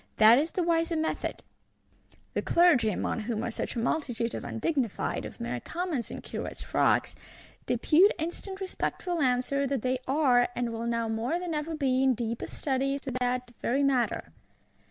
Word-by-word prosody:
That 220 +3 +8
is 310 +3 0
the 360 - -1
wiser 330 0 +1
method! 320 0 -2 0.9
The - - 0
Clergy, 335 -11 +4
among 210 - -1
whom 220 0 -2
are 235 - -2
such - - -4
a - - -1
multitude 240 -2 -1
of - - -4
Undignified, 250 - -1
of - - -9
mere 180 - -3
Commons 335 - -3
in - - -7
Curates' - - -6
frocks, - - +2 0.5
depute 360 +6 +5
instant 350 +4 -4
respectful 365 -2 -2
answer 260 +2 +1
that 270 -4 -2
they 255 0 0
are, 260 -3 +3
and 240 -1 -1
will 230 +1 -3
now 230 -1 0
more 225 +8 -1
than 355 -2 -4
ever 310 +2 -2
be, 265 -3 +1
in 265 -1 +4
deepest 230 0 -4
study 275 0 0
as 280 - -5
to 270 - -5
that 250 0 -1
very 270 +4 +1
matter. 260 -3 +1
265 Hz, 175 wpm, -28 LUFS, 235-320 Hz, 0.9 s, That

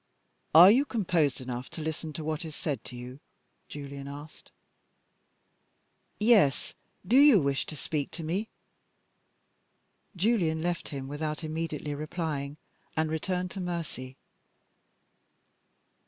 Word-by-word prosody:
"Are 175 +4 +11
you 255 +6 +5
composed 180 - 0
enough 125 0 -5
to - - -7
listen 160 0 -4
to 155 - -5
what 155 +2 -2
is 155 -2 -7
said 140 -8 -3
to 125 - -9
you?" 125 +2 -8 0.5
Julian 140 -1 -7
asked. 145 +2 -10 1.7
"Yes. 210 - +4 0.3
Do 230 - +2
you 280 -7 +8
wish 140 -2 0
to 155 - -6
speak 145 0 -2
to 165 - -6
me?" 190 +8 -2 1.7
Julian 180 -5 +2
left 175 -1 -2
him 135 -2 -5
without 150 +3 -4
immediately 155 -2 -3
replying, 150 -2 -3 0.4
and 155 0 +1
returned 180 +3 -2
to 195 - -6
Mercy. 165 -7 -5
155 Hz, 120 wpm, -29 LUFS, 140-175 Hz, 1.7 s, Are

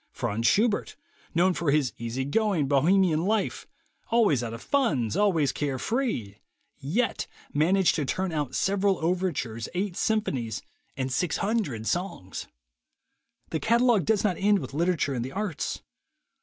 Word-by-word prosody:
Franz 115 +3 -1
Schubert, 215 0 +2 0.4
known 180 +2 +4
for 170 -3 -1
his 140 -2 +2
easy 120 +3 -3
going 185 -2 +1
Bohemian 160 +4 +3
life, 215 0 -1 0.4
always 215 - +3
out 115 -2 -4
of 115 - -6
funds, 145 - +1
always 170 -9 +2
care 140 -3 -2
free, 130 - -2 0.4
yet 205 - -1 0.3
managed 180 +5 +3
to 150 - -1
turn 185 +6 -1
out 150 -5 -2
several 195 0 +2
overtures, 165 -11 -1
eight 190 0 -1
symphonies, 140 - -1 0.3
and 130 -1 -2
six 160 +5 0
hundred 195 - -1
songs! 145 - -3 1.0
The 160 - -1
catalog 235 -2 +3
does 220 -2 +2
not 195 -5 +1
end 205 +1 +4
with 135 -6 -6
literature 165 -2 +1
and 120 -2 -2
the 130 - -6
arts. 200 -6 -3
170 Hz, 145 wpm, -27 LUFS, 135-205 Hz, 1.0 s, known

